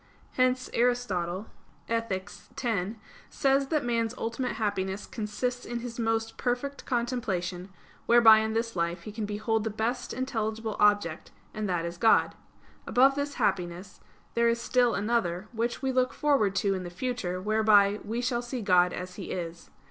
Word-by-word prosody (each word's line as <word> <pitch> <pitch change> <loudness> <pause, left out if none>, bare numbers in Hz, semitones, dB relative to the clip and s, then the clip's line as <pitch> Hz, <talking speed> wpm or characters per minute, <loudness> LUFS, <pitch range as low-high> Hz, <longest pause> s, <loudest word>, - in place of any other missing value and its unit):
Hence 255 0 +1
Aristotle 210 -7 0 0.4
(Ethic. 230 -5 -1 0.4
x) 220 -3 -1 0.3
says 275 0 +2
that 300 -3 0
man's 230 -1 0
ultimate 230 +3 -2
happiness 200 -2 -2
consists 245 +3 -3
in 240 0 -4
his 240 -1 -7
most 225 0 -1
perfect 255 +3 -2
contemplation, 200 -8 -2 0.4
whereby 230 -2 +8
in 220 0 -1
this 230 +1 -1
life 170 0 -1
he 215 - -7
can 215 0 -4
behold 215 +1 -1
the 220 - -1
best 230 +4 -2
intelligible 220 -3 -2
object; 205 -6 +2 0.2
and 215 -2 -3
that 175 -2 0
is 170 0 -5
God. 225 - +4 0.5
Above 265 +2 +5
this 285 +1 -3
happiness 185 -4 -2 0.3
there 235 0 +3
is 230 0 +1
still 245 0 +2
another, 205 -3 -1
which 235 +2 -2
we 265 - +1
look 255 0 +1
forward 275 -10 +2
to 195 +1 +2
in 190 - -3
the 175 - -6
future, 185 -2 -3
whereby 210 0 +4
"we 230 +3 -3
shall 240 -1 0
see 245 -1 -5
God 180 -2 +4
as 180 0 -6
He 195 - -6
is." 170 -1 -5
220 Hz, 160 wpm, -28 LUFS, 195-245 Hz, 0.5 s, whereby